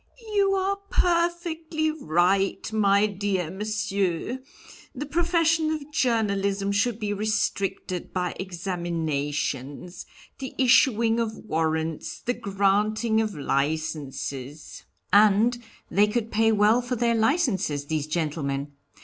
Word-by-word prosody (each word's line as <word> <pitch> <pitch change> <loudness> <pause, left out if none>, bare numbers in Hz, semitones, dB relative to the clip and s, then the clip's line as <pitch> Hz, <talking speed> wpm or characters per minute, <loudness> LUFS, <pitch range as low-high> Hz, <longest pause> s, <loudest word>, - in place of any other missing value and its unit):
"You 395 -1 +3
are 390 +1 0
perfectly 335 -2 0
right, 195 - +1
my 200 -1 +4
dear 195 -4 -2
Monsieur, 200 +1 -2 0.6
the 280 +3 -4
profession 330 0 +2
of 305 -2 -4
journalism 200 -6 +1
should 210 +3 +1
be 210 -2 -2
restricted 200 -3 -2
by 180 -1 -2
examinations, 165 -4 -3 0.3
the 265 -1 -6
issuing 235 -3 +4
of 225 -1 -2
warrants, 160 -4 -2
the 245 - -1
granting 215 +1 +1
of 215 -3 -3
licenses 145 -1 -3
" - - -45
"And 215 +4 +5 0.3
they 205 +4 +4
could 225 +1 -2
pay 225 +1 +3
well 215 +3 +4
for 245 +1 -3
their 235 0 +1
licenses, 220 - +1
these 155 0 -2
gentlemen. 145 -3 -2
205 Hz, 110 wpm, -25 LUFS, 170-245 Hz, 0.6 s, And